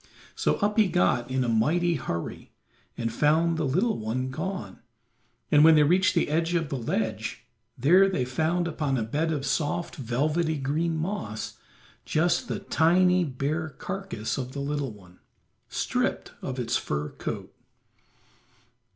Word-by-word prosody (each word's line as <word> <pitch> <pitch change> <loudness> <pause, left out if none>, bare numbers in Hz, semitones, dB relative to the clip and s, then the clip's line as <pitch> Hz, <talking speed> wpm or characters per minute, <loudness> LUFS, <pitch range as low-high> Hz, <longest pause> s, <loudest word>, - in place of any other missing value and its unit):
So - - +1
up 210 +2 +2
he 210 - +5
got 120 - +1
in 130 0 0
a - - -1
mighty 160 +10 +2
hurry 85 - -5 0.4
and 115 -1 -2
found 160 +5 +3
the 160 -3 0
little 190 - +1
one 125 +4 -2
gone, 185 +8 -5 0.7
and 150 0 +7
when 160 0 +8
they 150 - +6
reached 180 +5 +3
the - - +2
edge 165 +3 +1
of 165 -4 0
the - - -2
ledge, 110 0 -3 0.3
there 180 +10 +5
they 130 -10 0
found 160 +7 0
upon 150 -4 -1
a 115 - 0
bed 150 +9 -1
of 145 -3 -2
soft 150 +4 -1
velvety 150 +6 0
green 155 +5 -1
moss 155 - -4 0.4
just 170 +3 +1
the - - -2
tiny, 180 +2 +3
bare 155 +3 -2
carcass 155 - -4
of 130 0 -5
the 140 - -4
little 140 -2 -2
one, 90 -4 -16 0.5
stripped - - -1
of 130 - -4
its 120 -1 -1
fur 75 +1 -3
coat. - - -6
150 Hz, 150 wpm, -27 LUFS, 125-170 Hz, 0.7 s, when